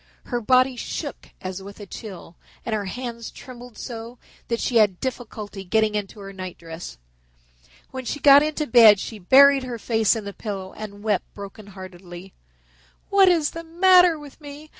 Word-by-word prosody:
Her 245 -2 -3
body 255 +3 +3
shook 240 - -6
as 185 +1 -6
with 200 +2 -11
a 205 - -8
chill 190 -4 -10 0.3
and 230 - -3
her 210 -2 -2
hands 235 +2 -6
trembled 245 -2 -12
so 235 0 -8 0.3
that 235 -1 -2
she 240 - 0
had 205 -5 +3
difficulty 220 -6 -6
getting 215 +3 +1
into 210 0 -4
her 195 0 -9
nightdress. 170 - -9 0.9
When 260 -1 -7
she 290 - -4
got 280 0 +8
into 305 0 -1
bed 225 -6 +7
she 220 +1 -7
buried 275 +8 +6
her 250 -2 -6
face 225 -1 +1
in 220 -2 -5
the 200 - -6
pillow 195 -3 -6
and 205 -1 -9
wept 210 -4 -1
brokenheartedly. 190 -3 -11 0.8
"What 395 -1 +6
is 330 -4 +2
the 330 - -7
matter 355 0 +5
with 295 0 -13
me? 295 +1 -11
225 Hz, 165 wpm, -23 LUFS, 200-260 Hz, 0.9 s, got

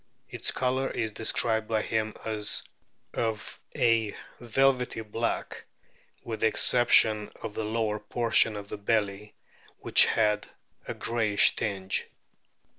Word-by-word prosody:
Its - - +1
colour 130 +1 -1
is 110 -2 -3
described 110 0 +1
by 110 -1 -1
him 110 -1 -2
as 105 -2 +1 0.5
of 110 -2 -4 0.2
a 115 -3 +1 0.2
velvety 125 0 0
black, 115 +2 -4 0.6
with 110 -2 -6
the 110 - +3
exception 110 -2 +4
of 105 - -5
the 110 - -4
lower 110 -1 -2
portion 110 0 +1
of 100 0 -8
the 100 - -8
belly, 105 -1 -2 0.5
which - - +5
had 105 -2 0 0.4
a - - -5
greyish 110 -3 +1
tinge. 95 -2 -3
110 Hz, 120 wpm, -27 LUFS, 105-115 Hz, 0.6 s, which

